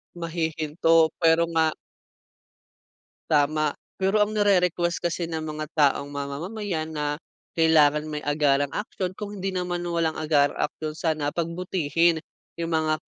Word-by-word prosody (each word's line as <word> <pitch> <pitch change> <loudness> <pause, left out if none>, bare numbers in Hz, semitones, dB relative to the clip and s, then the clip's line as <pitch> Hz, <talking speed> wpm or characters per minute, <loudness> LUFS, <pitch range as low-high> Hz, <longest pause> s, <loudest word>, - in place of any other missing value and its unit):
Mahihinto 165 -1 +1
pero 165 0 +4
nga 160 -1 +3 1.6
Tama, 150 0 +2 0.2
pero 195 +2 +2
ang 210 - -3
nire-request 180 -4 +2
kasi 170 0 -1
ng 160 -1 -3
mga 155 0 -4
taong 140 -1 +3
mamamayan 160 +5 -4
na 150 -1 -2 0.4
kailangan 155 -2 +4
may 150 -1 -5
agarang 145 -1 +2
aksiyon. 190 -3 -3
Kung 205 +1 -7
hindi 195 0 -3
naman 180 -1 -2
walang 170 -2 0
agarang 150 -2 +2
aksiyon, 155 +1 -3
sana 155 -3 -1
pagbutihin 170 -1 +1 0.4
yung 170 0 -3
mga 155 -1 +1
160 Hz, 125 wpm, -25 LUFS, 150-175 Hz, 1.6 s, pero